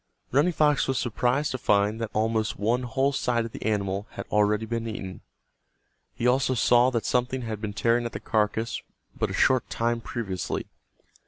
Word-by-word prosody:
Running 145 +7 +3
Fox 150 -3 +2
was 135 -1 0
surprised 125 +5 0
to 130 - -3
find 105 +1 +2
that 115 - -2
almost 110 0 0
one 115 +5 +1
whole 130 +3 +1
side 120 -3 0
of 115 - -7
the - - -8
animal 100 -1 -1
had - - -6
already 105 +1 +2
been 115 0 -3
eaten. 95 -4 -6 0.9
He 115 - -3
also 130 +1 +3
saw 120 +1 +4
that 115 -3 -2
something 125 +1 0
had 110 -2 -5
been 105 -2 -4
tearing 120 +4 +1
at - - -8
the - - -5
carcass 110 +1 -1 0.3
but - - -1
a - - -4
short 130 -1 +2
time 115 0 -1
previously. 105 -6 -3
115 Hz, 180 wpm, -26 LUFS, 105-125 Hz, 0.9 s, saw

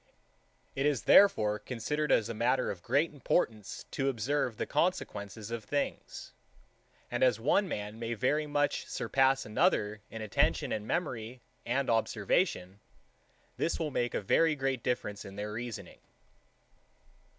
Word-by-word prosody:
It 135 +2 +1
is 140 -7 0
therefore 105 - +5
considered 130 +7 -2
as 110 - +3
a 115 - -4
matter 125 +4 +1
of 90 - -8
great 155 - +1
importance 110 -6 -1
to 135 0 0
observe 125 -1 -1
the - - -2
consequences 110 - -2
of 115 -2 -4
things; 140 +7 -4 0.8
and 120 - -2
as 125 -4 +4
one 190 - +2
man 105 - -5
may 115 0 -3
very 150 +6 +1
much 145 0 0
surpass 135 0 +1
another 105 0 +1
in 110 -1 -6
attention 105 - +1
and 105 0 -3
memory 125 -7 -3 0.2
and 130 +3 0
observation, 105 - 0 0.8
this 165 - 0
will 155 -3 -2
make 120 -2 -1
a - - 0
very 160 +10 +3
great 135 -3 -1
difference 105 -5 -2
in 100 -2 -10
their 105 +1 -4
reasoning. 120 0 -6
120 Hz, 140 wpm, -31 LUFS, 105-145 Hz, 0.8 s, therefore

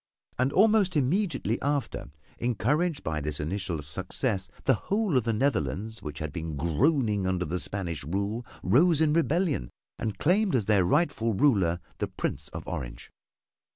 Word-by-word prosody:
And 130 +2 +2
almost 205 -1 +4
immediately 145 - 0
after, 145 -1 -2 0.3
encouraged 140 - 0
by 75 -1 -2
this 75 0 -3
initial 85 0 -3
success, 95 - -2
the - - +4 0.2
whole 205 -5 +1
of 125 -3 +3
the 115 - +1
Netherlands 110 - -1
which 75 -1 -6
had 80 -1 -4
been 80 -3 -4
groaning 105 - +1
under 90 -1 0
the 90 +4 -2
Spanish 90 -7 -3
rule 100 - -2 0.2
rose 160 +4 +4
in 155 -2 +3
rebellion 165 - +1 0.3
and 110 -3 -3
claimed 190 +1 +2
as 115 -5 +1
their 100 -3 +3
rightful 140 - +1
ruler 95 - +3 0.2
the - - 0
Prince - - -4
of - - -7
Orange. - - -6
110 Hz, 155 wpm, -28 LUFS, 90-150 Hz, 0.3 s, almost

